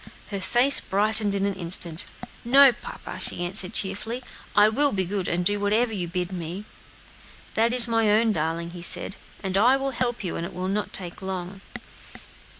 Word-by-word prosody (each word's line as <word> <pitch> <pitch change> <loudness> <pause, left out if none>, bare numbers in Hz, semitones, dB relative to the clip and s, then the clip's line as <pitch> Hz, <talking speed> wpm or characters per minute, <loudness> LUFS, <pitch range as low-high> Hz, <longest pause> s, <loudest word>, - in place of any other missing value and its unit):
Her 200 -1 -4
face 245 +8 +3
brightened 210 +1 0
in 200 0 0
an 200 - -1
instant. 170 -2 0 0.4
"No, 270 +3 +7
papa," 240 - -9
she 175 - 0
answered 185 +1 +1
cheerfully, 220 +6 -1 0.3
"I 205 0 +6
will 280 +6 +4
be 190 -2 0
good, 190 0 -3
and 175 +1 -1
do 205 +2 +1
whatever 220 +3 +1
you 180 -4 -3
bid 180 +1 -3
me." 180 +3 -6 0.9
"That 230 +1 +2
is 245 -1 +5
my 225 -2 +2
own 220 +2 +3
darling," 165 -1 -3
said 180 +2 +3
he, - - -15 0.2
"and 190 -1 -2
I 250 +5 +5
will 270 0 -2
help 240 -2 -2
you, 180 - -3
and - - -4
it 170 - -7
will 185 +1 -3
not 205 +2 -2
take 180 -1 -5
long." 190 0 -6
200 Hz, 185 wpm, -24 LUFS, 180-225 Hz, 0.9 s, No